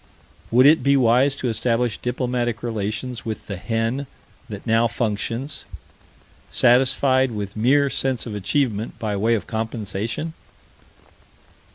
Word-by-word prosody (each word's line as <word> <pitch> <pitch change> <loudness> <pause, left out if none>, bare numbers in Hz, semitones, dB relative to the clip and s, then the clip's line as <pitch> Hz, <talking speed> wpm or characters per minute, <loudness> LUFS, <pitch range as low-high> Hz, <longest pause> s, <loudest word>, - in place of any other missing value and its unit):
Would 125 +3 +5
it 155 +3 +6
be 140 0 +3
wise 130 +3 +3
to 130 - -3
establish 115 0 0
diplomatic 125 -2 -2
relation 110 +2 -3
with 110 -2 -5
the 100 - -5
hen 115 +7 -2 0.4
that - - -8
now 115 +1 +3
functions, 115 +5 -3 0.9
satisfied 130 +1 +3
with 105 -3 -5
mere 135 +6 +3
sense 135 -2 -1
of 115 - -6
achievement 110 +2 -1
by 105 -2 -2
way 110 +4 +2
of 100 - -3
compensation? 110 +6 -3
120 Hz, 125 wpm, -22 LUFS, 110-130 Hz, 0.9 s, it